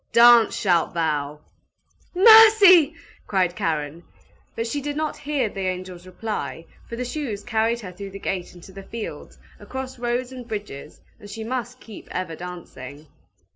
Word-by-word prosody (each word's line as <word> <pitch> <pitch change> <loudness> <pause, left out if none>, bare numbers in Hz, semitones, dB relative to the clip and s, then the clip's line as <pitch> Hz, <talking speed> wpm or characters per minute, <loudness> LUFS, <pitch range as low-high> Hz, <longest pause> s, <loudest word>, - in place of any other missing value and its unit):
Dance 235 -1 +6
shalt 175 -4 +1
thou 150 -3 -2 0.4
!" - - -38
"Mercy!" 400 -6 +8 0.3
cried 185 -3 0
Karen. 155 -1 -3 0.5
But 230 - -2
she 285 +5 -3
did 290 +1 -4
not 310 -1 -2
hear 285 -5 -2
the 195 -2 -4
angel's 185 -1 -6
reply, 180 - -5 0.2
for 235 - -5
the 250 +2 -4
shoes 245 -6 -5
carried 230 0 0
her 185 -4 -8
through 200 +2 -9
the 195 - -9
gate 185 -2 -4
into 175 +2 -14
the 195 +1 -10
fields, 220 +3 -8 0.2
across 260 -1 -7
roads 245 +1 -2
and 250 -2 -9
bridges, 205 - -8 0.2
and 205 - -13
she 220 +2 -7
must 250 +1 -5
keep 220 -5 -12
ever 180 -3 -4
dancing. 155 -5 -10
215 Hz, 160 wpm, -23 LUFS, 180-250 Hz, 0.5 s, Mercy